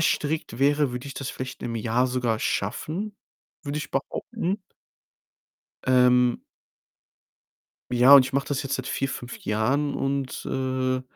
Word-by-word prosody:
strikt 155 -6 0
wäre, 145 0 +3
würde 125 +3 -5
ich 140 - -7
das 140 - -4
vielleicht 130 0 -7
im 115 -1 -3
Jahr 115 +3 +1
sogar 125 -3 0
schaffen, 165 - -2 0.5
würde 145 0 -3
ich 155 - -6
behaupten. 195 - -2 1.3
Ähm 125 -1 +4 1.5
Ja, 125 +3 +7
und 140 -2 +10
ich 130 +1 -6
mache 140 0 0
das 140 -2 -1
jetzt 135 0 -2
seit 130 - -5
4, 135 0 -1
5 120 -1 -7
Jahren 130 +8 +1
und, 135 -1 -2
äh, 130 -1 -1
130 Hz, 140 wpm, -25 LUFS, 125-145 Hz, 1.5 s, und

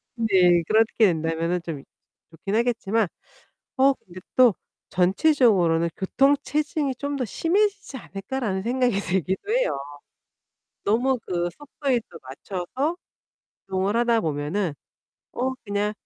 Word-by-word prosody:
네 185 -7 +4
그렇게 220 0 +4
된다면은 165 +1 -1
좀 160 -4 -5
이 - - -14 0.5
좋긴 195 +6 -4
하겠지만 225 -3 +1 0.7
어 275 +1 +5
근데 185 -7 -13 0.2
또 245 -6 +6 0.3
'전체적으로는 185 - +3
교통 275 +9 +3
체증이 295 -2 -1
좀 285 +2 -3
더 255 - -1
심해지지 385 - 0
않을까?'라는 195 -2 -4
생각이 245 -3 +1
들기도 190 - -1
해요. - - +1 1.1
너무 245 +4 +2
그 175 -1 -1
속도에 275 -3 -1
또 - - -11
맞춰서 195 - -4 0.7
이동을 190 +2 0
하다 235 -1 +3
보면은 155 +3 -1 0.6
어 260 +2 -1
그냥 205 0 -1
210 Hz, 265 characters per minute, -24 LUFS, 180-260 Hz, 1.1 s, 또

